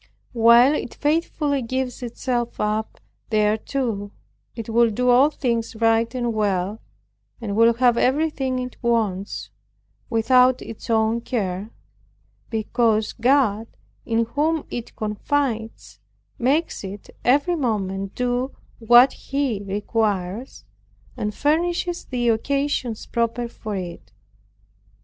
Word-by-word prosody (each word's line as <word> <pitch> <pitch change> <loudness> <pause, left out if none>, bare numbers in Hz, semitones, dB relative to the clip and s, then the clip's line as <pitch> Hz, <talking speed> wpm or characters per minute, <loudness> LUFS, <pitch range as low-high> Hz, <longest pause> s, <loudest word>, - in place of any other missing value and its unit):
While 235 +3 +6
it 275 - -4
faithfully 295 -2 0
gives 255 +1 -3
itself 240 0 -3
up 215 +1 -2 0.3
thereto, 215 0 0 0.5
it 230 -2 -6
will 235 +1 +3
do 250 +4 0
all 260 +4 +6
things 235 -6 -2
right 225 0 +2
and 240 -2 -1
well, 205 -1 -1 0.6
and 210 -4 -4
will 230 +1 +5
have 245 -1 +3
everything 270 -2 +1
it 250 0 -5
wants, 215 -5 -1 0.6
without 250 +2 +4
its 225 - -10
own 225 +1 +2
care; 205 -4 -3 0.8
because 220 -1 +1
God 235 -3 +2 0.4
in 230 0 +1
whom 300 +6 0
it 235 - -6
confides, 225 +1 -2 0.4
makes 280 +5 0
it 195 +1 -8
every 290 +8 +3
moment 195 - -2
do 250 +2 -1 0.2
what 240 +3 +6
He 270 -7 -2
requires, 205 +2 -2 0.5
and 215 -4 -2
furnishes 345 - 0
the 245 -2 0
occasions 255 0 -1
proper 235 0 -1
for 215 -3 -6
it. 175 - -7
235 Hz, 110 wpm, -23 LUFS, 215-260 Hz, 0.8 s, While